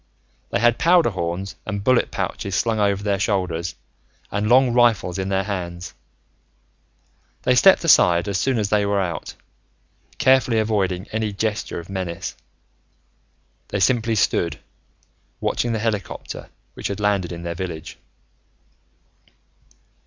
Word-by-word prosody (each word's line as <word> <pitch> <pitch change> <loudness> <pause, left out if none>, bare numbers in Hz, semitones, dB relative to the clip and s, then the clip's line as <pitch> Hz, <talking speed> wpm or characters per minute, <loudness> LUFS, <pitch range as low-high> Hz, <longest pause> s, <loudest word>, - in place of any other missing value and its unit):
They - - 0
had 120 +1 +3
powder 170 -7 +4
horns 90 +1 -4
and 100 -1 -4
bullet 130 +2 +3
pouches 100 -2 -3
slung 115 +1 +1
over 100 -1 +1
their 100 -2 0
shoulders, 90 -4 -1 0.6
and 105 +1 -1
long 125 0 +5
rifles 115 -7 +2
in 95 0 -2
their 95 0 +1
hands. 90 -3 -5 1.5
They 125 - +3
stepped 190 +10 +6
aside 90 - +5
as 100 -2 -1
soon 135 -2 +1
as 105 -2 0
they 105 0 +2
were 100 0 +1
out. 85 -5 -4 0.8
Carefully 130 -3 +3
avoiding 100 -4 0
any 110 -1 -2
gesture 105 -1 -2
of 85 - -10
menace, 95 -3 -4 1.3
they 105 - -3
simply 115 +2 +2
stood, 85 -4 +1 0.8
watching 120 - -1
the 115 - 0
helicopter 105 -3 -4 0.2
which - - -4
had 100 +1 -4
landed 100 -4 0
in 85 0 -7
their 85 0 -3
village. 85 -3 -6
100 Hz, 130 wpm, -22 LUFS, 90-115 Hz, 1.5 s, stepped